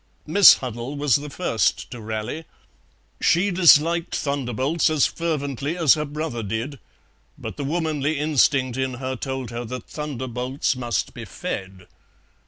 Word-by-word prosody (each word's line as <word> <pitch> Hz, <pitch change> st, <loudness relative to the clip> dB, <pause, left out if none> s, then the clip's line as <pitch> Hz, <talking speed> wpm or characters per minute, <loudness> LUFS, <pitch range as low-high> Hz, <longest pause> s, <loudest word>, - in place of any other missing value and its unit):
Miss 180 Hz, +5 st, +8 dB
Huddle 125 Hz, +2 st, -6 dB
was 145 Hz, -4 st, +3 dB
the 145 Hz, +1 st, -7 dB
first 140 Hz, -7 st, -1 dB
to 120 Hz, -3 st, -7 dB
rally; 110 Hz, +8 st, -4 dB, 0.8 s
she 195 Hz, +4 st, +3 dB
disliked 170 Hz, -1 st, +4 dB
thunderbolts 140 Hz, +3 st, 0 dB
as 155 Hz, -3 st, +3 dB
fervently 150 Hz, -2 st, -2 dB
as 160 Hz, -6 st, +5 dB
her 150 Hz, -1 st, -2 dB
brother 150 Hz, -4 st, -4 dB
did, 115 Hz, +6 st, -4 dB, 0.6 s
but -, -, -7 dB
the -, -, -5 dB
womanly 155 Hz, -1 st, -1 dB
instinct 140 Hz, -3 st, +2 dB
in 130 Hz, -1 st, -1 dB
her 130 Hz, +1 st, -4 dB
told 130 Hz, -2 st, -5 dB
her 120 Hz, +1 st, -4 dB
that 125 Hz, +1 st, -7 dB
thunderbolts 130 Hz, -2 st, -3 dB
must 120 Hz, -6 st, -2 dB
be -, -, -8 dB
fed. 95 Hz, -1 st, -6 dB
140 Hz, 140 wpm, -23 LUFS, 125-155 Hz, 0.8 s, Miss